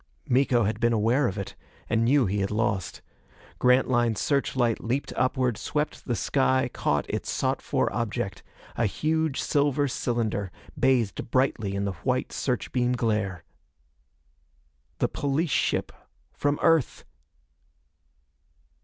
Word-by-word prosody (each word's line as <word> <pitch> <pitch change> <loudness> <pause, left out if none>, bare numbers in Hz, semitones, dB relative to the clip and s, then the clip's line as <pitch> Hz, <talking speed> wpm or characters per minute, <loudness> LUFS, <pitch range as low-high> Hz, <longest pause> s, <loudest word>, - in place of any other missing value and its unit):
Miko 125 -2 +3
had 105 +1 -1
been 120 0 +2
aware 115 +5 +2
of 95 - -4
it, 100 - -5 0.3
and 115 - +1
knew 130 +2 +4
he 100 +1 -1
had 100 0 0
lost. 100 -6 -1 0.6
Grantline's 125 -3 +3
search 140 -2 0
light 120 -3 +1
leaped 130 +5 -2
upward, 130 -3 +1
swept 150 0 -3
the 120 - -1
sky, 130 0 +1
caught 75 -2 0
its - - -3
sought - - 0
for - - 0
object - - -3 0.3
a 115 - +1
huge 155 +6 0
silver 145 0 +1
cylinder, 115 -6 -2 0.2
bathed 120 -6 +1
brightly 115 -6 +1
in 100 0 -1
the 100 - -2
white 130 -1 0
search 125 -3 -2
beam 125 -1 +1
glare. 105 -7 -1 1.5
The - - +1
police 145 +3 -1
ship - - 0 0.4
from 145 0 0
Earth! 165 -5 +2
120 Hz, 130 wpm, -26 LUFS, 110-135 Hz, 1.5 s, knew